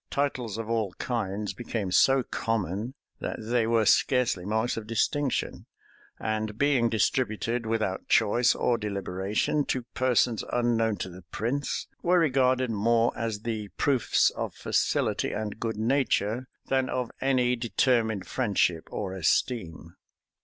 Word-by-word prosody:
Titles 130 -6 -1
of 115 -1 -4
all 110 -5 -1
kinds 105 -4 -3
became 110 -5 -4
so 135 +7 +4
common, 115 +1 -2 0.2
that - - -3
they 115 +1 0
were 115 -1 +3
scarcely 120 -6 +2
marks 110 +4 0
of 110 -1 -6
distinction; 135 +5 -1 0.5
and 110 -1 -2
being 135 -4 +3
distributed, 115 +1 0
without 110 -4 -1
choice 120 +4 +3
or 120 -2 +1
deliberation, 100 +6 -1
to 130 -2 -2
persons 125 -3 +2
unknown 115 -2 +1
to - - -4
the 90 0 -11
prince, 130 +6 -2 0.2
were 180 +1 +3
regarded 130 -5 +2
more 115 +2 +2
as 110 -3 -3
the 110 -2 -3
proofs 135 -5 +3
of - - -5
facility - - 0
and 105 0 -4
good 110 -2 -3
nature, 120 -1 0 0.2
than 130 -1 0
of 125 -2 -2
any 125 -2 +2
determined 115 -3 +1
friendship 100 -9 0
or 95 -3 -3
esteem. 85 -3 -1
115 Hz, 130 wpm, -27 LUFS, 105-125 Hz, 0.5 s, so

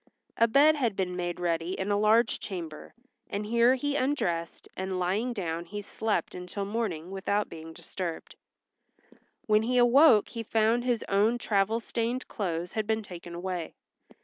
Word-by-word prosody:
A 230 - +4
bed 285 +6 +5
had 235 -8 0
been 180 -2 -2
made 175 -1 -3
ready 170 +1 -1
in 190 +2 -1
a - - +3
large 220 +3 +3
chamber, 165 -6 -7 0.3
and 205 +1 -3
here 235 +3 +4
he 290 +2 -2
undressed 185 -13 -1
and 190 0 -3
lying 195 +7 0
down 170 -6 -3
he 205 +4 -6
slept 220 +1 -2
until 180 +2 -5
morning 195 -6 -3
without 200 +2 -1
being 160 0 -9
disturbed. 170 0 -6 1.1
When 215 0 +4
he 250 +3 0
awoke 245 -1 +6
he 230 - -5
found 225 +2 +1
his 245 -3 0
own 210 +4 +3
travel 215 -1 +1
stained 235 +2 -3
clothes 175 -4 -3
had 215 -2 -2
been 220 0 0
taken 175 -3 -9
away. 175 -2 -4
205 Hz, 160 wpm, -28 LUFS, 180-230 Hz, 1.1 s, awoke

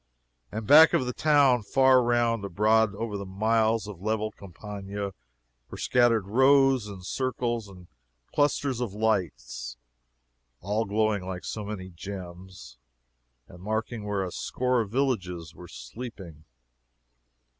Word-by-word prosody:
And 110 0 -5
back 155 +7 +8
of 130 - +2
the 125 - -3
town, 140 -5 +4
far 130 +3 +4
around 120 -1 +1
and 100 - -7
abroad 105 +2 +2
over 105 -1 -4
the 100 - -5
miles 110 +3 +1
of 100 -4 -9
level 110 +1 -1
campagna, 100 +1 -7 0.6
were - - -8
scattered 120 -5 +2
rows, 130 +1 +4
and 95 -3 -9
circles, 120 -2 -2
and 90 -2 -14 0.5
clusters 140 -3 +1
of 110 -5 -3
lights, 80 - -2 0.8
all 105 - -1
glowing 105 -1 0
like 90 -1 -6
so 110 - -4
many 100 -3 -6
gems, 90 -7 -10 0.7
and 90 - -14
marking 110 +2 -3
where 105 -2 -2
a 90 - -5
score 125 +4 -1
of 105 - -5
villages 90 - -2
were 90 - -12
sleeping. 80 - -10
105 Hz, 135 wpm, -27 LUFS, 95-120 Hz, 0.8 s, back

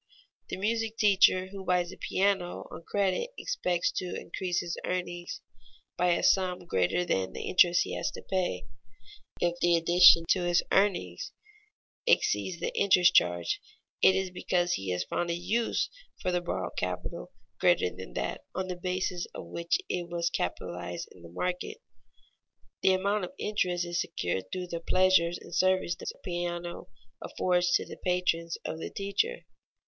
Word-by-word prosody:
The - - -3
music 225 +2 -1
teacher 190 -2 +4
who 195 0 -8
buys 180 -1 +1
a - - -9
piano 190 -2 0
on - - -8
credit 200 - 0
expects 180 - 0
to 180 - -3
increase 180 -2 -2
his 170 -1 -4
earnings 175 -1 -4 0.5
by 180 0 +3
a - - -1
sum 180 -2 +2
greater 95 - +1
than 95 - -1
the - - -5
interest 175 -1 +4
he - - -6
has - - -1
to - - -9
pay. 180 - -1 0.7
If 175 0 0
the 175 0 +4
addition 170 0 +7
to 185 - +4
his 175 0 +2
earnings 200 - +1 0.7
exceeds 185 - +2
the - - -3
interest 180 -3 +5
charge, 85 -1 +2 0.4
it 190 - +6
is 190 -1 -1
because 180 -1 0
he 95 -1 -3
has 90 0 0
found 170 - -2
a 170 - 0
use 210 +7 0 0.3
for 180 - -1
the 180 0 +1
borrowed 95 - -4
capital 90 -8 -4 0.3
greater 90 - +3
than 90 -10 -9
that - - -3
on 185 0 -2
the 180 - -2
basis 180 0 -2
of - - -6
which 170 0 -1
it 175 -1 -3
was 170 0 -1
capitalized 90 -1 -4
in 90 - -16
the 85 - -11
market. 180 - -3 1.0
The 190 - +5
amount 200 +1 +1
of - - -11
the - - -6
interest 180 -4 0
is 175 0 -1
secured 95 - -2
through 180 -1 -4
the 170 - -2
pleasures 175 -1 +3
and 170 - -12
services 185 0 +2
the - - -5
piano 175 -1 -4 0.3
affords 180 -1 +1
to - - +1
the - - -9
patrons 180 -2 0
of 160 - -4
the - - -5
teacher. 195 - -2
175 Hz, 165 wpm, -29 LUFS, 170-185 Hz, 1.0 s, addition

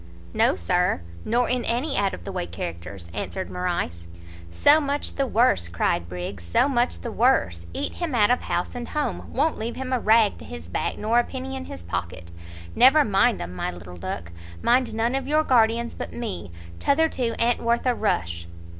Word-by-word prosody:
"No, - - +3
Sir, 135 - +1 0.2
nor 240 +2 +1
in 250 -1 0
any 260 +5 0
out 200 -1 +1
of 85 - -13
the - - -5
way 85 - -3
characters," 85 +2 -6
answered 190 - -4
Morrice. 170 - -3 0.4
"So 290 - +5
much 285 0 -1
the 275 -1 0
worse," 225 - +3
cried 85 0 -1
Briggs, 90 +1 -6
"so 85 - +2
much 245 -3 0
the 235 - -5
worse! 85 - +2
Eat 85 - -3
him 335 -7 -3
out 210 -1 +4
of 245 - +2
house 175 - -2
and 245 -1 -5
home; 300 -1 -3
won't 305 +4 +1
leave 230 +2 -3
him 260 0 -4
a 255 - +2
rag 220 - +4
to - - -10
his 80 +2 -9
back - - -2
nor 225 +3 +2
a - - +3
penny 265 +1 -6
in 265 - -5
his 85 - -9
pocket. 85 0 -5 0.4
Never 270 +5 +6
mind 195 - +2
'em, 85 +1 -7
my 90 - -2
little 90 0 -9
duck; 85 -1 -5 0.3
mind 240 -2 +3
none 230 +2 +1
of 270 0 -2
your 305 +2 +3
guardians 235 -2 +3
but - - -6
me; 210 - -5 0.3
t'other 320 +3 +3
two 245 -6 -2
a'n't 235 +1 +2
worth 235 +2 +1
a 250 - +3
rush." 85 - -1
220 Hz, 200 wpm, -24 LUFS, -, 0.4 s, Never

